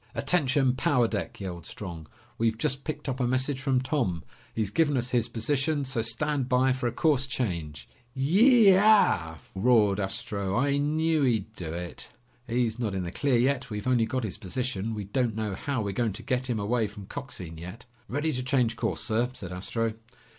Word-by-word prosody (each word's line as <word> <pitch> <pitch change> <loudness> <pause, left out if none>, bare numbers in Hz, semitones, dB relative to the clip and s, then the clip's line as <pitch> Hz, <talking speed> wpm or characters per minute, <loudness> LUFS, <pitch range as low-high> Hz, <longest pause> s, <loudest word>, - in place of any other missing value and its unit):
"Attention, 135 -6 +2
power 125 -2 +2
deck!" 100 -6 -4
yelled 90 -4 -6
Strong. 85 -6 -8 0.3
"We've 115 -1 +1
just 135 +4 0
picked 150 -2 -4
up 130 -1 -2
a 125 - +1
message 130 +2 0
from 130 -2 +1
Tom. 125 - -1 0.3
He's 110 -3 -2
given 145 +3 +2
us 125 +1 -2
his 120 -2 +1
position, 140 +5 0
so 130 -3 -1
stand 130 +4 -1
by 130 0 +3
for 130 -1 -2
a - - 0
course 140 +1 +2
change." 85 - -3 0.3
"Yeee 205 - +6
eooow!" 190 - +4 0.2
roared 105 -1 +3
Astro. 100 0 -2
"I 140 +2 +2
knew 155 +2 +1
he'd 110 -5 +1
do 85 -5 -5
it." 85 +1 -6 0.4
"He's 120 -1 0
not 110 -5 -1
in 95 - -1
the 85 - -4
clear 135 +3 +1
yet. 130 +2 +1
We've 105 -2 -5
only 120 -3 +3
got 130 +1 -2
his 105 - -4
position. 110 +1 -2
We 105 - -4
don't 115 +2 -1
know 110 -2 -2
how 135 +2 -2
we're 100 - -2
going 110 +1 0
to - - -7
get 125 0 -1
him 115 -3 0
away 110 +2 +1
from 105 -1 -10
Coxine 95 - -6
yet." 95 +9 -9 0.2
"Ready 145 +4 0
to 125 -3 -2
change 125 -4 +1
course, - - -1
sir," 115 +3 +1
said 90 -7 -7
Astro. 110 +5 -2
120 Hz, 190 wpm, -27 LUFS, 105-135 Hz, 0.4 s, Yeee